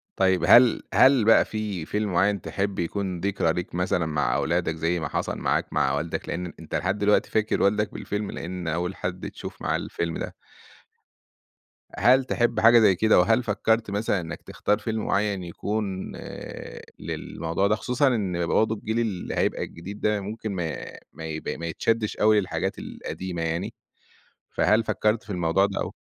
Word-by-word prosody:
طيب 95 -1 +2
هل 120 -1 +7
هل 130 -4 +6
بقى 115 - +6
في 105 -6 -4
فيلم 105 +2 -2
معيّن 100 +3 +2
تحب 100 0 -3
يكون 90 +1 -2
ذكرى 95 -3 0
ليك 90 0 -5
مثلًا 90 -1 0
مع 75 -5 0
أولادك، 85 0 0
زي 85 +2 0
ما 80 - -2
حصل - - -2
معاك - - -1
مع 70 - +2
والدك 75 +3 -3
لإن 90 +1 -3
ان 90 - -7
أنت 80 - -6
لحد 95 +3 0
دلوقتي 105 0 +3
فاكر 110 0 +1
والدك 105 +1 +2
بالفيلم 105 0 -4
لإن 90 0 -5
أول 90 +4 -2
حَد 90 0 -4
تشوف - - -9
معاه - - 0
الفيلم 85 -1 -3
ده - - -5 1.6
هل 130 +2 +5
تحب 120 -2 +1
حاجة 115 +1 +7
زي 100 -4 +5
كده 110 +3 +4
وهل 115 +6 +3
فكّرت 110 0 0
مثلًا 100 -2 0
إنك 85 0 -7
تختار 105 - -1
فيلم 110 -1 -3
معيّن، 100 -2 0
يكون 95 +2 -3
آآ - - -8 0.2
للموضوع 85 +4 -2
ده 105 - +3
خصوصًا 125 +6 +1
إن 95 -9 0
برضه 110 +4 +2
الجيل 110 +2 -2
اللي 105 -6 -2
هيبقى - - 0
الجديد 95 +5 -8
ده 105 -1 +1
ممكن 110 +2 -5
ما 85 -3 -2 0.4
ما 80 - -8
يبق 80 0 -4
ما 85 - -6
يتشدّش 110 +6 -1
أوي 105 0 +5
للحاجات 95 - -3
القديمة 90 -2 -6
يعني 85 +7 -2 0.8
فهل 110 +2 +2
فكّرت 105 +1 +1
في 105 - -14
الموضوع 90 +1 +2
ده 100 - -3
أو؟ - - -4
100 Hz, 175 wpm, -25 LUFS, 85-110 Hz, 1.6 s, هل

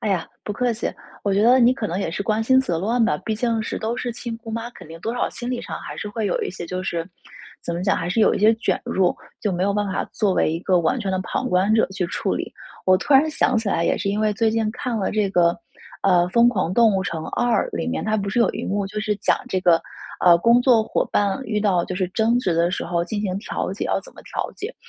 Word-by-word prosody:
哎 215 - -2
呀， 185 -4 0 0.2
不 210 - -4
客 245 +3 0
气。 220 - -3 0.3
我 200 - 0
觉 200 - +2
得 250 +3 +6
你 240 +2 +6
可 230 -5 -3
能 175 +3 -3
也 195 - -2
是 200 - -3
关 215 +1 0
心 260 +3 +4
则 175 -10 -1
乱 230 +7 +1
吧， 210 - +1
毕 220 - -1
竟 225 0 0
是 - - -4
都 225 +2 -2
是 245 -2 -3
亲 235 -1 -6
姑 230 -1 -9
妈， 230 +1 -4
肯 - - -13
定 165 +1 -10
多 225 +6 -3
少 245 - -1
心 240 -1 -6
理 250 -1 -3
上 - - -6
还 - - -8
是 210 - -5
会 215 0 -2
有 190 - -1
一 - - -2
些 175 -2 -7
就 185 +2 -4
是 170 -1 -3 0.5
怎 170 - -4
么 170 - -3
讲， 195 - +2
还 170 0 -3
是 225 - -1
有 - - +4
一 - - -1
些 215 +2 +6
卷 200 -5 -1
入， 185 -2 +1 0.2
就 205 - -1
没 180 +1 -1
有 200 +1 +2
办 205 0 0
法 190 - -2
作 205 -3 +1
为 - - +2
一 165 - -2
个 180 -2 +2
完 170 +10 +1
全 200 -4 -2
的 185 - 0
旁 - - -2
观 185 +4 +2
者 225 - +3
去 185 -1 -2
处 - - -2
理。 - - -4 0.3
我 185 0 +6
突 290 - +1
然 280 +4 +6
想 255 -4 +1
起 220 -2 -1
来 170 -3 +1
也 - - +2
是 200 - -2
因 205 +1 0
为 215 -1 +2
最 220 +2 +1
近 220 -1 0
看 245 -3 -3
了 195 - -1
这 205 -2 +1
个， 170 -2 +3 0.5
呃， 180 -3 +4
《疯 235 +2 +5
狂 185 -5 -1
动 225 -4 +5
物 190 - +1
城 165 -3 -4
2》 240 +6 0
里 - - -2
面， 250 - -2
它 215 0 +1
不 200 -1 -2
是 215 +5 +1
有 235 - +4
一 - - -5
幕 200 0 -1
就 210 +1 -5
是 210 0 0
讲 205 - +1
这 190 -4 -1
个， 175 -2 +4 0.4
呃， 170 -1 +8
工 235 +7 +5
作 245 -4 +4
伙 - - 0
伴 200 +4 +1
遇 210 -1 -1
到 185 -5 +2
就 185 - -5
是 185 -1 0
争 225 +4 +1
执 185 - 0
的 170 +1 +2
时 - - -3
候 170 0 -1
进 205 +3 -3
行 190 -2 -2
调 205 - -4
解， - - -4
要 - - 0
怎 - - -15
么 - - -14
调 - - -4
解。 425 +5 -6
210 Hz, 305 characters per minute, -22 LUFS, 185-230 Hz, 0.5 s, 呃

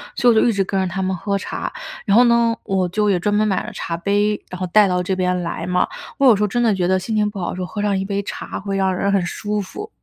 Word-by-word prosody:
所 245 - +4
以 - - +4
我 220 - +4
就 - - +3
一 230 - +2
直 195 - +1
跟 195 0 -2
着 190 - 0
他 190 +2 -3
们 190 0 0
喝 200 +3 -1
茶。 - - -4 0.4
然 200 - +3
后 245 - +8
呢， 235 -1 +3
我 190 -2 0
就 210 +4 0
也 190 -3 +2
专 205 +4 0
门 215 - +3
买 195 -3 +1
了 - - -7
茶 165 0 -4
杯， 205 +3 0
然 185 - -6
后 185 - -2
带 210 +3 +5
到 180 -1 0
这 190 +1 -2
边 180 -1 0
来 170 0 -4
嘛。 180 0 +2 0.3
我 275 - +4
有 245 - +8
时 205 - -3
候 210 - +3
真 240 +4 0
的 225 -3 +3
觉 180 -2 0
得 190 0 +3
心 185 +4 -4
情 210 -1 +2
不 205 - -10
好 - - -2
的 - - -4
时 185 - -4
候 180 - -3
喝 205 - -5
上 200 -2 +1
一 190 - -2
杯 200 0 -2
茶 - - -6
会 195 0 -3
让 190 -1 +1
人 200 +2 0
很 195 - +2
舒 210 +4 -3
服。 410 - -8
195 Hz, 345 characters per minute, -20 LUFS, 185-210 Hz, 0.4 s, 后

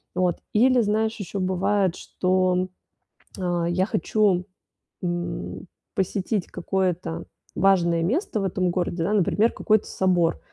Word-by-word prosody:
Вот, 180 -2 +1 0.2
или 250 +3 +5
знаешь, 220 +1 +1
еще 200 0 -4
бывает, 190 0 +1
что, 185 0 +1 0.7
а, 175 -2 0
я 185 +2 +2
хочу, 195 -1 +1 0.6
м, 175 0 -4 0.3
посетить 190 +1 -1
какое-то 180 -2 -2 0.3
важное 170 -3 +3
место 240 - 0
в 195 - -1
этом 185 -1 0
городе, 175 -1 -1
да, 195 - 0
например, 210 +3 +3
какой-то 215 -1 +2
собор. 175 -3 +1
185 Hz, 120 wpm, -24 LUFS, 175-205 Hz, 0.7 s, или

